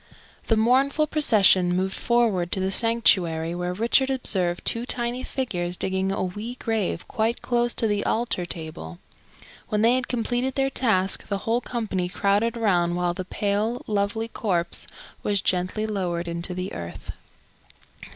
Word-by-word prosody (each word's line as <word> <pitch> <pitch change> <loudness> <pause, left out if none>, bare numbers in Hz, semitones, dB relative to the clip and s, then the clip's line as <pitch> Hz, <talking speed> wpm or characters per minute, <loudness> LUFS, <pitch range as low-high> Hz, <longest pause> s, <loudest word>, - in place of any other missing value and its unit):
The 225 - +3
mournful 270 +7 +3
procession 200 - +4
moved 190 +1 -1
forward 220 -8 +1
to - - +3
the 190 0 -1
sanctuary, 185 -8 +3
where 180 0 -3
Richard 235 +7 +2
observed 185 -9 +2
two 230 - +1
tiny 240 0 -2
figures 180 -11 -3
digging 190 0 -1
a 195 - -1
wee 210 +6 -5
grave 220 -8 -2
quite 230 0 -1
close 240 -1 0
to - - +3
the 205 -1 0
altar 230 -5 0
table. 155 - -6 0.7
When 210 0 0
they 235 +2 +5
had 255 -1 -1
completed 245 +2 -1
their 270 -1 +1
task, 195 -8 +1
the 200 - -1
whole 230 +2 +1
company 205 -8 -3
crowded 205 +5 +1
around 175 -6 +1
while 175 0 0
the 185 +1 -6
pale, 210 +5 -1
lovely 210 +2 -1
corpse 185 -6 -1 0.3
was 205 -1 +1
gently 185 +4 0
lowered 180 -5 -2
into 170 +2 -3
the 185 +1 -4
earth. 85 0 -7
205 Hz, 150 wpm, -24 LUFS, 180-235 Hz, 0.7 s, they